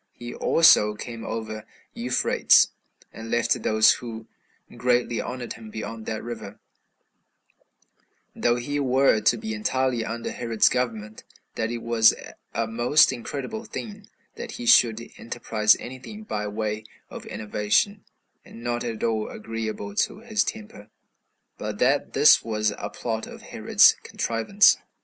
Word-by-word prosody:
He 120 0 -8
also 105 -10 +4
came 115 +1 -8
over 110 -1 -5 0.3
Euphrates, 125 +1 +3 0.4
and 115 0 -9
left 120 0 +1
those 110 0 +5
who 115 -2 -8 0.5
greatly 120 -2 +1
honored 125 -1 -6
him 110 -1 -12
beyond 110 +1 -7
that 110 -1 -4
river, 115 -4 -8 1.8
though 120 0 +1
he 145 +4 -3
were 130 -4 +3
to 120 - +3
be 110 0 -5
entirely 125 +2 -1
under 115 +1 -5
Herod's 115 -3 +2
government; 110 -4 -3
and - - -29
that 115 +1 -2
it 120 -1 -5
was 115 -1 +4 0.4
a 115 - -1
most 120 +6 +3
incredible 140 - -6
thing 210 -3 -8 0.3
that - - -7
he 120 - -7
should 115 0 +4
enterprise 110 -2 +1
any 130 +1 -8
thing 210 +12 -10
by 105 - -4
way 105 +1 -3 0.3
of - - -9
innovation, 110 - 0 0.4
and 115 - -13
not 120 0 -2
at 115 -2 -5
all 110 -2 -1
agreeable 110 -2 -5
to 195 - -1
his 220 -3 0
temper, 210 - -8 0.7
but 105 -1 -5
that 135 +5 +1
this 145 +2 +6
was 110 -2 -1
a - - -4
plot 110 -2 -4
of - - -12
Herod's - - +4
contrivance. 115 - +2
115 Hz, 140 wpm, -24 LUFS, 110-125 Hz, 1.8 s, this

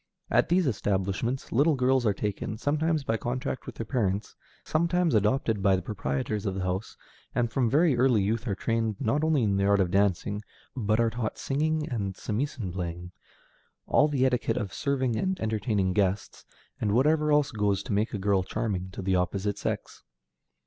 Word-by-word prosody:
At - - +3
these 180 +1 +3
establishments 105 +2 -1
little 145 +6 +3
girls 130 -2 +2
are 105 - +3
taken, 105 +1 -3
sometimes 155 +4 0
by 115 -4 0
contract 125 +4 -3
with - - -7
their 115 - -5
parents, 105 -5 -1 0.3
sometimes 170 +1 +1
adopted 110 0 +2
by 95 -1 +4
the 95 - -3
proprietors 95 +2 -2
of 95 - -2
the 95 - -2
house, 95 +3 -3 0.4
and 120 -2 +1
from 125 -2 +1
very 150 +2 +4
early 120 -4 +3
youth 115 +5 -1
are 100 - 0
trained 115 0 -1
not 140 +5 0
only 155 -5 +2
in 100 -2 +1
the 100 - +2
art 100 0 +4
of 90 -2 +1
dancing, 100 +1 +1 0.3
but 110 -3 +1
are 115 -1 +2
taught 115 -1 -3
singing 155 +2 0
and 100 -6 -3
samisen 115 - -3
playing, 90 -1 -5 0.7
all 150 - +4
the 135 -3 +1
etiquette 125 -3 +1
of 100 -4 -3
serving 130 -4 0
and 190 -1 -1
entertaining 105 - 0
guests, 100 0 -1 0.3
and 105 -2 0
whatever 150 +5 +3
else 150 -1 +3
goes 100 -3 0
to - - -3
make 105 +3 +1
a 105 - -3
girl 100 0 +2
charming 95 -2 -3
to 95 - -6
the 95 0 +1
opposite 95 +3 -1
sex. - - -4
110 Hz, 185 wpm, -28 LUFS, 100-135 Hz, 0.7 s, by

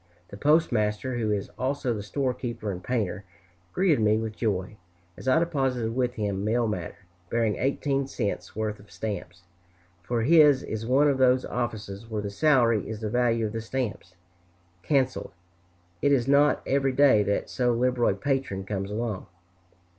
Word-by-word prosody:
The - - -9
postmaster, 120 -4 +1
who 110 -2 0
is 100 -2 -2
also 130 -1 -1
the 105 - -4
storekeeper 120 -2 -3
and 90 -1 -7
painter, 105 -6 -2 0.5
greeted 175 - +2
me 110 0 +3
with 110 -1 -4
joy, 105 -2 -2 0.4
as - - -10
I 130 - +5
deposited 135 -8 0
with 125 -1 0
him 100 -2 -2
mail 115 +2 +1
matter 105 - -4 0.3
bearing 115 -3 0
eighteen 135 0 0
cents' 110 -6 -4
worth 110 -1 -3
of 100 0 -17
stamps; 90 -2 -6 0.6
for 115 +4 -1
his 150 -1 +6
is 110 +1 -5
one 135 +4 +4
of 140 -2 +1
those 130 0 +4
offices 110 -3 -4
where 105 -2 -3
the 100 - -4
salary 120 -4 +3
is 110 -1 -6
the 105 -1 -3
value 115 -2 +2
of 105 - -4
the 115 - -3
stamps 115 -6 -4 0.7
cancelled. 130 - 0 0.7
It 140 - +3
is 130 -3 +2
not 145 +1 +4
every 135 -1 +1
day 135 -5 +5
that 100 0 -1
so 125 -1 +1
liberal 120 0 +2
a - - 0
patron 130 -9 -2
comes 100 -1 -3
along. 110 -2 -3
115 Hz, 165 wpm, -26 LUFS, 105-130 Hz, 0.7 s, his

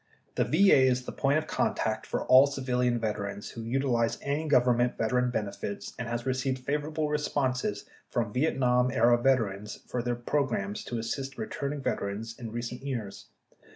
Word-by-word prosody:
The - - +1
VA 190 -1 +5
is 130 -1 +3
the - - -5
point 140 +2 +1
of 155 - -1
contact - - -1
for - - -2
all 130 +2 +7
civilian 125 -3 0
veterans 105 -2 -3
who 115 - -7
utilize 120 -1 0
any 145 +3 -1
government 125 -3 +3
veteran 125 +2 +1
benefits 100 -3 -4
and 120 - -3
has 120 +1 -3
received 130 0 0
favorable 150 +4 -2
responses 135 -7 -1 0.2
from 115 -3 -1
Vietnam 125 -3 +2
era 120 0 +4
veterans 105 -6 0
for 125 - -2
their 120 0 -1
programs 120 -5 -1
to 120 - -3
assist 135 +4 -4
returning 145 -10 -4
veterans 110 +2 -3
in 115 -3 -6
recent 120 +1 -5
years. 120 -8 -5
125 Hz, 155 wpm, -29 LUFS, 115-135 Hz, 0.2 s, all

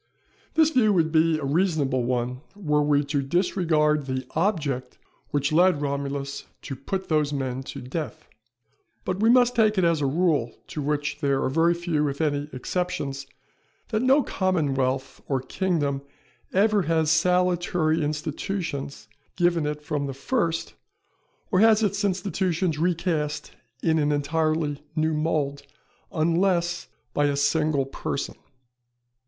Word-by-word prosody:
This 320 -1 +5
view 240 -7 +4
would 160 -4 +2
be 160 0 +3
a 150 - -4
reasonable 145 -5 +1
one 125 +1 -1
were 150 -7 +1
we 145 0 +3
to 140 0 -1
disregard 155 -2 +1
the 130 -1 -2
object 155 -8 -1 0.3
which 145 0 0
led 175 0 +4
Romulus 140 -1 -3 0.2
to 135 - -5
put 190 +8 -4
those 150 -2 +1
men 130 -2 -2
to 135 - -8
death. 155 +4 -5 0.8
But 185 +1 -2
we 220 +2 +4
must 245 0 +5
take 215 -2 +3
it 185 - +3
as 165 -3 +2
a 140 - +2
rule 150 -6 +1
to 150 - -4
which 145 0 -1
there 140 -3 +1
are - - +1
very 165 +4 +3
few 165 -4 0
if 140 0 -4
any 145 -2 0
exceptions, 140 -2 -3 0.6
that 220 -1 0
no 270 +3 +4
commonwealth 135 -7 -1
or 135 -2 +1
kingdom 145 -1 -1 0.5
ever 205 +2 +3
has 160 -2 +1
salutary 175 -1 +2
institutions 150 - -4 0.3
given 175 -3 +2
it 150 0 -4
from 150 -2 -2
the 135 - -5
first 165 - -1 0.8
or 185 - +3
has 220 0 +5
its 205 0 0
institutions 185 -4 0
recast 165 -3 -1 0.3
in 160 -1 +3
an 150 -1 +2
entirely 150 0 0
new 155 0 +1
mould, 150 -2 -1 0.5
unless 175 +1 +1 0.3
by 145 - +2
a 145 -1 +1
single 145 0 +1
person. 135 +1 -4
155 Hz, 140 wpm, -25 LUFS, 140-180 Hz, 0.8 s, This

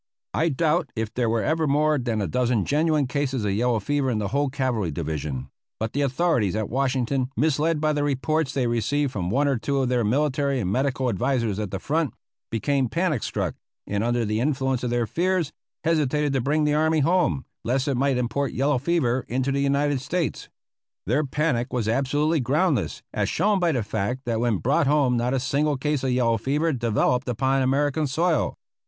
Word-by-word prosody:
I 165 +2 +2
doubt 160 +1 +1
if 110 -1 -3
there 120 -2 0
were 115 -1 +1
ever 160 0 +1
more 150 +1 +2
than 115 -4 -1
a - - -1
dozen 120 +2 +1
genuine 150 0 +2
cases 135 -3 -1
of 100 - +1
yellow 115 +3 +1
fever 135 +6 0
in 115 - 0
the 105 -2 -2
whole 140 +4 +1
cavalry 130 - -1
division; 75 -4 -4 0.3
but 110 0 -3
the 145 - 0
authorities 135 - +1
at 110 -2 -2
Washington, 130 0 0
misled 155 +1 +1
by 155 0 +1
the 145 -1 0
reports 145 +1 0
they 135 -3 0
received 125 +4 0
from 90 -7 -3
one 140 +7 +2
or 135 -4 +1
two 140 +4 -1
of 130 -2 +1
their 125 -2 +1
military 140 +3 +1
and 95 -5 -1
medical 130 +2 0
advisers 115 -1 0
at 105 -2 -3
the 95 - -3
front, 150 - -1 0.3
became 130 +3 0
panic 165 - 0
struck, - - -2 0.3
and 100 +1 -1
under 120 0 +1
the 105 +1 -1
influence 130 -1 0
of 125 - 0
their 120 -1 +1
fears 175 - 0 0.3
hesitated 150 -3 +1
to 135 - +1
bring 150 +5 +1
the 150 0 +2
army 155 +1 +2
home, 165 -3 +1 0.2
lest 130 +3 0
it 140 - +1
might 135 +1 +1
import 125 +2 -1
yellow 135 0 +1
fever 130 -5 +1
into 130 +3 -1
the 140 - 0
United 140 -1 +1
States. 165 -1 -2 0.6
Their 130 +9 +1
panic 140 -4 -1
was 120 -4 -1
absolutely 145 +6 +1
groundless, 140 - 0
as - - 0
shown 205 -1 +2
by 175 -2 +2
the 125 -7 0
fact 110 +4 -2
that 115 -2 -1
when 120 -3 +1
brought 140 - +1
home 140 -4 +3
not 120 +2 0
a - - +1
single 145 +2 0
case 150 0 -1
of 130 - 0
yellow 120 -3 +2
fever 150 +7 0
developed 125 +1 0
upon 135 +3 +1
American 145 +3 +1
soil. 160 +2 0
135 Hz, 195 wpm, -24 LUFS, 120-150 Hz, 0.6 s, home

